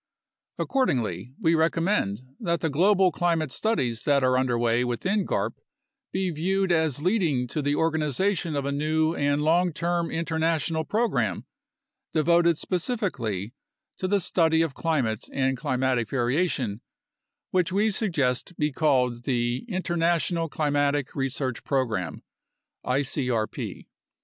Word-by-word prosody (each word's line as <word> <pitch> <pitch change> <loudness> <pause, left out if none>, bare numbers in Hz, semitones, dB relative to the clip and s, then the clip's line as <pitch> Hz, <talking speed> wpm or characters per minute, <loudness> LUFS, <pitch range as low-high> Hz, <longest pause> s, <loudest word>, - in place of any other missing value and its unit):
Accordingly, 130 - -1
we 165 -5 +3
recommend 165 - +1 0.2
that 170 -1 -1
the 160 - 0
global 185 +4 +4
climate 165 -5 0
studies 130 - -1
that 140 -2 +3
are 130 0 +3
under 130 -2 +1
way 120 +1 +2
within 185 - -1
garp - - 0 0.6
be 185 -1 -1
viewed 190 +4 0
as 160 -4 +1
leading 170 - +1
to 150 - -2
the 145 +1 +1
organization 160 +2 0
of 140 -1 -1
a 140 - -1
new 155 +2 +1
and 145 -1 +1
long 175 +3 +3
term 170 +1 -1
international 160 -1 0
program 230 +6 0 0.7
devoted 170 +1 +3
specifically 155 - -2 0.5
to 185 - -1
the 200 +1 +2
study 165 -2 +2
of 160 -4 -3
climate 130 -11 -1
and 135 -1 +1
climatic 125 -2 0
variation, 125 - 0 0.7
which 180 -1 +1
we 210 +3 +2
suggest 165 - -1
be 150 0 0
called 125 -5 +1
the 120 - 0
International 170 -2 0
Climatic 145 -2 0
Research 135 -2 -2
Program 110 - -1 0.6
(icrp). 125 -4 -2
155 Hz, 125 wpm, -26 LUFS, 130-175 Hz, 0.7 s, global